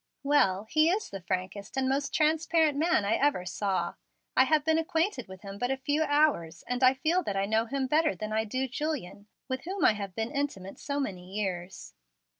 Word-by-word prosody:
"Well, 200 -10 +3
he 310 +8 +3
is 415 +4 -1
the 195 - -6
frankest 185 +4 -4
and 265 0 +1
most 275 +1 0
transparent 320 -1 +2
man 310 -8 +2
I 215 +3 +2
ever 280 -11 +1
saw. 190 +1 -1 0.4
I 260 - +6
have 305 +1 +2
been 320 0 +3
acquainted 325 - -1
with 190 +2 -12
him 195 0 -8
but 245 - 0
a 270 - 0
few 290 +3 0
hours, 290 - +1
and 250 +2 -2
I 255 +1 +6
feel 330 +7 +1
that 205 - -3
I 195 - +1
know 220 +2 +1
him 270 +2 -1
better 305 +3 +2
than 215 0 -5
I 220 0 +2
do 255 +5 -2
Julian, 255 - -4 0.2
with 260 +1 -4
whom 380 -1 -1
I - - +6
have 200 -3 -6
been 225 +1 -2
intimate 275 -10 -4
so 285 0 -3
many 190 -7 -5
years." 190 -3 -4
260 Hz, 210 wpm, -29 LUFS, 200-300 Hz, 0.4 s, I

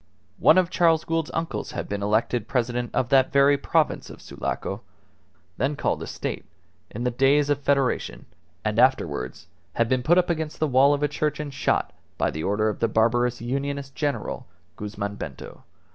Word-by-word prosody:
One 155 - +6
of 185 -1 +3
Charles 165 -2 +3
Gould's 165 -1 -1
uncles 165 0 -3
had - - -4
been 100 - -3
the 100 - -2
elected 110 +1 0
President 120 -1 -1
of 125 - 0
that 135 0 +4
very 140 0 +5
province 140 - 0
of - - -11
Sulaco - - -4 0.8
(then 135 +5 0
called - - -1
a - - -5
State) - - -4 0.5
in 120 - -5
the 125 - +1
days 140 +4 +3
of 145 - +1
Federation, 140 -2 0 0.4
and - - 0
afterwards 65 - +1 0.3
had 115 - +1
been 130 +1 +1
put 170 +7 +3
up 180 -1 +3
against 160 -2 -3
the 155 - +2
wall 140 +1 +4
of 145 - -4
a - - +4
church 150 +1 -2
and 145 -2 -5
shot 140 - 0 0.2
by - - +1
the 80 - -5
order 105 +2 +1
of 105 - -2
the 115 - +2
barbarous 120 +2 +1
Unionist 140 +2 -3
general, 145 0 -3 0.3
Guzman 100 -1 -5
Bento. 70 -5 -9
135 Hz, 185 wpm, -25 LUFS, 115-150 Hz, 0.8 s, One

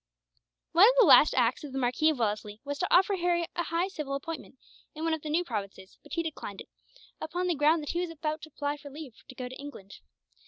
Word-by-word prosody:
One 350 +4 +7
of - - +1
the - - +8
last 300 - +7
acts 245 +2 +2
of 285 -3 -8
the - - -3
Marquis 265 +5 +2
of 310 - 0
Wellesley 210 -2 -2
was 285 0 -4
to 360 - 0
offer 385 +2 +4
Harry 345 -1 +1
a - - 0
high 335 +3 0
civil 300 -7 -4
appointment, 290 -1 -7 0.4
in 310 - -6
one 325 -1 +1
of 320 - -2
the 305 - -6
new 330 +4 +1
provinces; 200 - -6
but - - -13
he 335 - 0
declined 290 -11 -6
it, - - -13 0.5
upon 350 +3 -2
the 355 - +1
ground 305 +1 +3
that 295 - -3
he 345 - -2
was 355 - -3
about 310 -1 -4
to 315 - -10
apply 290 0 -3
for 290 -1 -11
leave 285 -3 -9 0.2
to 260 - -11
go 250 -1 -5
to 255 - -9
England. 275 -9 -10
300 Hz, 245 wpm, -29 LUFS, 260-335 Hz, 0.5 s, the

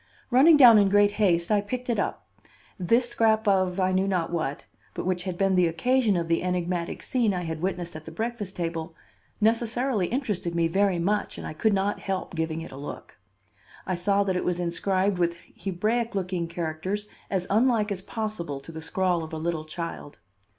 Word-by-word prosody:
Running 290 +6 +7
down 240 -6 +9
in 200 -1 +4
great 205 +1 +4
haste, 180 -4 +1
I 205 -1 +4
picked 250 +5 -5
it 235 - 0
up. - - -2 0.5
This 230 +7 +2
scrap 220 -2 +2
of 185 -2 +2
I 185 0 +2
knew 190 +1 +1
not 180 -4 0
what, 155 -5 -3 0.3
but - - -4
which 180 0 -1
had 185 -2 -3
been 195 0 +2
the 180 -2 +4
occasion 220 +5 +2
of 170 -1 -2
the 165 0 +1
enigmatic 180 -1 -2
scene 230 -6 +1
I 180 - -2
had 160 -1 -4
witnessed 180 -2 -3
at 155 0 -8
the 160 - -8
breakfast 220 +1 -4
table, 165 -1 -4 0.4
necessarily 230 -1 +1
interested 205 -9 -2
me 170 -1 +2
very 195 +2 +2
much 205 +5 -1
and - - -7
I - - -5
could 215 +7 +1
not 200 +1 0
help 190 -1 -4
giving 160 -1 -2
it 165 - -8
a 130 - -9
look. 145 -5 -9 0.7
I 185 - -1
saw 200 +3 +2
that 190 -2 -1
it 180 - -1
was 180 0 -1
inscribed 185 +2 0
with 170 -1 +1 0.2
Hebraic 215 +5 -1
looking 180 -3 -2
characters 170 +5 -3 0.2
as 185 -2 -1
unlike 220 -1 +3
as 190 -2 -3
possible 210 - -4
to 140 - -11
the 160 0 -7
scrawl 180 0 0
of 160 - -9
a - - -3
little 160 -1 -2
child. 165 -2 -6
185 Hz, 200 wpm, -26 LUFS, 170-210 Hz, 0.7 s, down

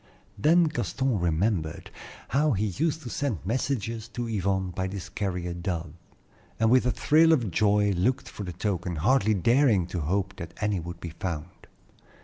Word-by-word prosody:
Then 160 +12 +4
Gaston 135 - -1
remembered 85 -1 -1 0.4
how 145 +1 +2
he 105 +1 0
used 155 - -1
to 125 - -6
send 130 - -2
messages 115 -1 -2
to 120 0 -5
Yvonne 95 -3 -1
by 95 +2 -2
this 95 0 -6
carrier 90 -3 -3
dove, 85 -3 -4 0.7
and 110 0 +3
with 125 -1 +4
a - - +3
thrill 160 +7 +4
of 120 - +2
joy 105 +2 +3
looked 100 +8 0
for 105 - -7
the 90 - -5
token, 90 -1 -2
hardly 110 - +3
daring 115 - +3
to 90 - -1
hope 95 +5 -1
that 85 0 -8
any 105 -3 0
would 85 +1 -7
be 85 - -6
found. 85 0 -6
100 Hz, 165 wpm, -27 LUFS, 90-120 Hz, 0.7 s, Then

